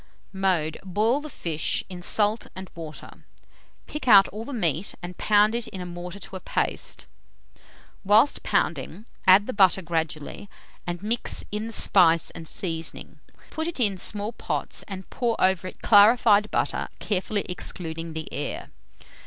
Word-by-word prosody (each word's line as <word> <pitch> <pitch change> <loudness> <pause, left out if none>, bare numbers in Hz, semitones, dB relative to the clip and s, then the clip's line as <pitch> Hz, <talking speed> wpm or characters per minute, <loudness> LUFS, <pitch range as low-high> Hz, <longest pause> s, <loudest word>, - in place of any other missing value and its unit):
Mode. 180 -5 0
Boil 215 +8 +1
the 305 - -8
fish 165 - -2
in 180 -1 -8
salt 210 +4 +1
and 190 0 -9
water; 160 -2 -10 0.6
pick 300 -3 -7
out 200 -4 +8
all 215 +3 -7
the 285 - -8
meat 175 - 0
and 180 +1 -7
pound 210 +1 +4
it 235 -1 -1
in 190 - -8
a 180 - -5
mortar 175 +1 -7
to 195 - -9
a - - -5
paste. - - -3 1.0
Whilst 215 +8 +4
pounding, 215 - -1 0.2
add 190 +2 +7
the 255 - -4
butter 190 -2 +4
gradually, 160 +2 -4 0.4
and 175 +1 -4
mix 230 +3 0
in 210 +2 -3
the 230 - -8
spice 170 -6 +4
and 165 -1 -7
seasoning. 165 -2 -3 0.3
Put 320 +1 -3
it 340 - -5
in 205 -5 +2
small 205 +4 +1
pots, - - -4
and 190 -2 -8
pour 235 -3 -1
over 185 -1 +2
it - - -12
clarified 210 0 +6
butter, - - -1
carefully 205 +1 -2
excluding 165 -2 -3
the 160 0 -6
air. 145 - -4
195 Hz, 155 wpm, -25 LUFS, 175-215 Hz, 1.0 s, out